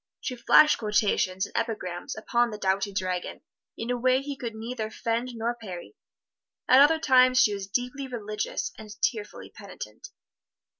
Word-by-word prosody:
She 255 - -4
flashed 300 +5 +5
quotations 205 -3 +1
and - - -14
epigrams 180 -6 -3
upon 235 +2 +1
the 210 - -6
doughty 195 0 0
dragoon 185 -2 -3 0.4
in 230 +2 -3
a 245 - 0
way 255 +1 +3
he 280 +1 -5
could 235 -4 -6
neither 220 0 -4
fend 235 +2 -3
nor 230 +1 -1
parry. 210 - -9 0.7
At 260 +2 +7
other 310 +3 +6
times 255 -4 +5
she 210 - +5
was 200 -1 -5
deeply 250 +6 -3
religious 215 -4 -4
and 215 -1 -10
tearfully 220 -6 -2
penitent. - - -10
230 Hz, 155 wpm, -27 LUFS, 210-255 Hz, 0.7 s, At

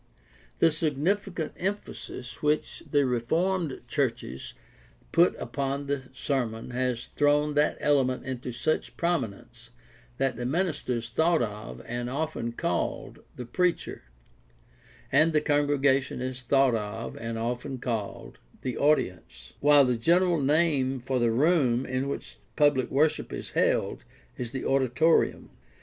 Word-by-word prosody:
The 165 - +4
significant 165 +4 -1
emphasis 185 -9 -5
which 150 0 0
the 145 -2 +3
reformed 160 +7 0
churches 120 - -2 0.6
put - - +4
upon 140 0 -3
the 140 -2 -3
sermon 125 -4 -2
has 125 -1 -2
thrown 145 +1 +3
that 150 +1 +2
element 130 -3 +2
into 125 -1 -4
such 120 -1 -2
prominence 120 - -3 0.5
that 130 -3 0
the 120 - -3
minister 165 -3 -1
is 115 -1 -2
thought 160 +4 +2
of, 105 0 -6
and 120 +1 -3
often 140 -4 -2
called, - - -2 0.2
the 125 - -6
"preacher," 180 +8 -1 1.1
and 160 +1 +4
the 155 - +5
congregation 145 -3 +2
is 130 0 -4
thought 135 +1 +3
of, 110 +1 -4
and 115 0 -4
often 125 +4 -3
called, 115 -5 -4 0.2
the 125 -3 -3
"audience," 90 - 0
while 145 -1 +6
the 125 -2 +1
general 175 +6 +3
name 140 -3 +2
for 125 +1 -1
the 120 -1 +3
room 135 -2 +3
in 130 +1 -2
which - - -6 0.2
public 145 -4 +3
worship 150 +3 +1
is - - -6
held - - +1 0.3
is 120 -2 -4
the 130 -1 -4
"auditorium." 135 +4 +2
135 Hz, 130 wpm, -27 LUFS, 120-150 Hz, 1.1 s, while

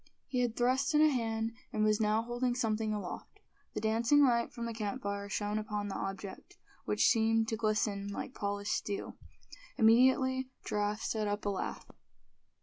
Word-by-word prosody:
He 255 - -2
had 240 -2 0
thrust 260 +5 +2
in 300 - +6
a 310 - +7
hand, 225 -3 -1 0.2
and 215 -3 0
was 215 0 +3
now 215 +1 +2
holding 240 +1 -1
something 220 -2 0
aloft. 205 -4 -6 0.4
The - - -1
dancing 230 +6 +4
light 235 -2 +2
from 235 - -5
the 230 - -3
campfire 200 -2 -3
shone 205 +1 -1
upon 210 -1 -3
the - - -4
object, 195 0 -6 0.3
which - - +2
seemed 225 -1 +3
to 225 - 0
glisten 210 -2 0
like 205 +5 -5
polished 205 -1 -3
steel. 200 -1 -3 0.6
Immediately 260 +3 +4 0.2
Giraffe 210 +1 -1
set 215 -2 -1
up 205 +1 -2
a - - +1
laugh. 195 - -4
220 Hz, 165 wpm, -32 LUFS, 205-240 Hz, 0.6 s, a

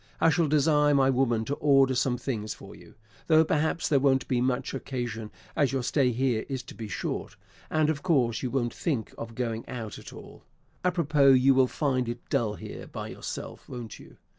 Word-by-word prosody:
I 165 - +5
shall 165 -1 +2
desire 150 0 +3
my 135 -1 +4
woman 120 -4 +1
to 140 - -2
order 135 -2 +4
some 125 0 +1
things 115 -4 -4
for - - -12
you; - - -16 0.3
though 160 0 +5
perhaps 160 +2 0
there 145 -3 +3
won't 135 -1 +2
be 125 -2 +1
much 130 +1 -1
occasion, 120 -5 -4 0.3
as 140 -4 +2
your 135 -2 -1
stay 130 +1 +2
here 120 -2 0
is 130 -2 -3
to - - -11
be 110 - -7
short; - - -4 0.3
and 155 -1 +2
of 155 -2 -1
course 130 -10 +1
you 130 - -2
won't 120 -2 -1
think 135 - -2
of 115 0 -8
going 115 -2 -2
out 115 -4 -6
at - - -11
all. - - -12 0.4
Apropos, 150 -6 +4
you 130 +1 +5
will 130 -1 +4
find 130 -4 -1
it 120 +1 -7
dull 105 -3 +1
here - - -8
by - - -6
yourself, - - -7
won't 120 -4 -7
you? - - -15
130 Hz, 200 wpm, -27 LUFS, 120-145 Hz, 0.4 s, I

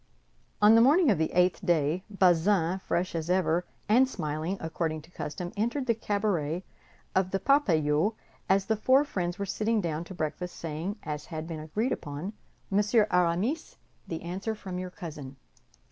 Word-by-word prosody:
On 210 +1 +8
the 230 - +7
morning 290 +3 +5
of 185 - +1
the 160 - 0
eighth 180 +3 +2
day, 170 0 +1
Bazin, 185 -1 +3
fresh 180 -1 -1
as 165 0 -3
ever, 180 -1 +2 0.2
and 255 +5 +5
smiling, 160 - -3
according 160 -1 -3
to 165 - -18
custom, 175 +2 -5
entered 235 +6 -1
the 235 - +3
cabaret 200 -7 -1 0.5
of 190 -1 +2
the 195 - -1
Parpaillot 175 - +2 0.3
as 195 0 +3
the 220 - +1
four 260 +6 +4
friends 175 -8 -3
were 200 - -2
sitting 215 +3 0
down 165 -4 -2
to 190 - -9
breakfast, 175 +2 -3
saying, 165 +5 -4
as 150 -1 -5
had 160 -2 -5
been 165 -2 -5
agreed 210 - -2
upon: 150 +8 -4 0.4
"Monsieur 210 +2 +4
Aramis, 180 - +1 0.3
the 165 - -5
answer 190 +6 -3
from 185 -3 -6
your 185 0 -4
cousin." 150 -7 -8
180 Hz, 165 wpm, -28 LUFS, 160-210 Hz, 0.5 s, On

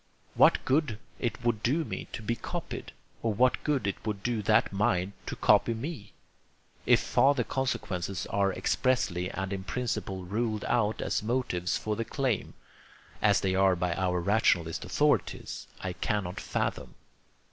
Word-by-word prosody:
What - - +5
good 135 -5 +1 0.2
it 120 -1 -2
would 115 -3 +1
do 145 +9 +1
me - - -5
to 115 - -5
be 115 +2 0
copied, - - -6 0.3
or 115 -2 0
what 125 +3 +3
good 145 -6 0
it 100 - -3
would 105 -3 -3
do 120 -3 0
that 105 0 +3
mind 95 -1 +1 0.2
to - - -3
copy 115 - +4
me, 115 - -6 0.7
if - - +6
farther 140 -2 +3
consequences 100 -9 -2
are 100 -1 +2
expressly 90 -2 0
and 95 0 -3
in 95 -1 -4
principle 100 -5 -3
ruled 110 +2 -1
out 110 -3 +1
as - - 0
motives 110 -5 -1
for 110 -2 -2
the 115 - -2
claim 125 0 -2 0.7
(as - - +4
they 95 -1 +1
are 95 0 +4
by 90 0 0
our 90 0 0
rationalist 85 -4 +2
authorities) - - 0
I 95 -1 -3
cannot 95 -2 -2
fathom. - - -3
105 Hz, 155 wpm, -29 LUFS, 95-120 Hz, 0.7 s, if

